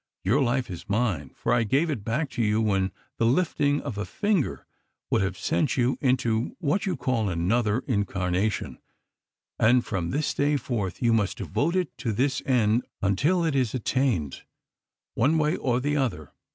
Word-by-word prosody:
"Your 120 +10 +2
life 125 -3 0
is 90 +4 -8
mine, 100 - 0
for - - 0
I 120 - +3
gave 140 +9 +1
it 120 -9 -4
back 130 +6 -1
to - - -2
you 105 0 +2
when 95 -3 +1 0.3
the 115 - +3
lifting 145 0 +1
of 125 -8 -5
a - - -1
finger 205 - -1 0.5
would - - +3
have 95 -1 -1
sent 150 - 0
you 125 +1 +1
into 125 -3 +1
what 185 +4 0
you 185 - +1
would 150 - -8
call 115 -5 0
another 105 +7 +1
incarnation; 100 -3 -1 0.8
and 120 +2 +4
from 90 -5 -2
this 145 +2 -1
day 145 +1 +1
forth 110 -7 -3
you 115 -1 +4
must 100 -4 +1
devote 145 - -1
it 175 -9 -1
to 115 - -1
this 135 +5 0
end 120 -2 +3 0.2
until 150 - +2
it 160 - +1
is 130 -3 +1
attained, 120 - 0 0.7
one 145 +8 +2
way 150 +1 +2
or 125 -2 0
the 145 +3 0
other. 90 - -2
120 Hz, 180 wpm, -26 LUFS, 105-140 Hz, 0.8 s, and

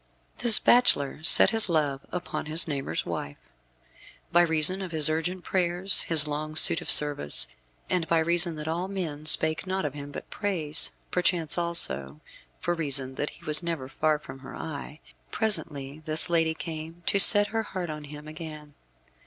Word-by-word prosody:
This 235 -3 +5
bachelor 150 - 0
set 175 - +7
his 225 -3 +5
love 145 -4 -3
upon 180 -3 -7
his 160 +3 +7
neighbour's 140 -3 -6
wife. 70 0 -8 0.9
By 175 0 +3
reason 165 +3 +1
of 185 -3 -9
his 155 -1 +2
urgent 175 +3 -5
prayers, 180 +1 +1
his 160 -2 +1
long 155 +1 -7
suit 160 - +5
and - - -8
service, 75 - +4 0.4
and 180 -3 -4
by 165 - -1
reason 170 +1 +1
that 150 0 -10
all 170 +3 -5
men 160 -6 -8
spake 160 +3 +3
naught 190 -2 -4
of 145 - -6
him 145 -1 -11
but - - -12
praise 165 -7 -2 0.2
perchance, 175 -3 -2
also, 120 - -3 0.4
for 175 - -4
reason 140 -5 -4
that 145 +3 -6
he - - -19
was 150 0 +4
never 165 -6 -7
far 155 +3 -2
from 135 -3 -14
her 135 - -13
eye 150 0 -10 0.3
presently 150 -9 -5
this 155 +3 +1
lady 165 -1 -1
came 165 +1 -10
to 200 - -1
set 205 +1 +8
her 225 +2 -4
heart 185 -6 -8
on 150 -1 -10
him 150 +1 -13
again. 155 -1 -12
160 Hz, 170 wpm, -24 LUFS, 150-175 Hz, 0.9 s, set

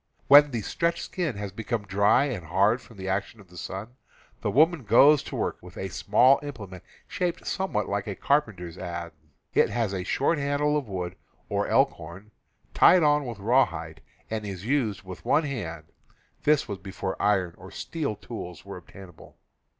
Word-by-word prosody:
When 145 +1 +8
the 120 -4 -3
stretched 170 - -1
skin 160 - -3
has 100 -1 -5
become 115 +2 -3
dry 100 +6 +3
and 105 - -4
hard 100 +8 +2
from 115 -3 -16
the 95 0 -6
action 95 +3 -2
of 95 -3 -17
the 90 - -17
sun, 105 +8 -7 0.4
the - - -1
woman 160 +1 +3
goes 135 +7 +6
to - - -8
work - - -2
with - - -13
a - - -4
small 135 +2 +4
implement 100 - -8 0.2
shaped 175 -1 -3
somewhat 190 - -1
like 100 +1 -2
a 100 - -3
carpenter's 95 - -1
adze; 85 -2 -5 0.4
it - - +4
has 115 -5 -1
a 95 -1 -3
short 145 - +1
handle 145 +1 +1
of 145 -5 -1
wood 90 -1 -4 0.3
or - - 0
elkhorn, 85 +6 0 0.4
tied 180 -2 +6
on 145 -2 +3
with 115 -3 -6
rawhide, 95 - 0 0.3
and 110 -1 -3
is 100 -2 -6
used 115 -7 0
with 95 -1 -10
one 155 - +3
hand 85 - -5 0.5
[this 150 -1 +3
was 100 -2 -5
before 95 -1 -5
iron 95 -4 +2
or 95 +1 -12
steel 150 - -4
tools 100 -6 -8
were 100 -1 -7
ob 90 - -14
tainable]. 95 -4 -14
105 Hz, 180 wpm, -26 LUFS, 95-140 Hz, 0.5 s, When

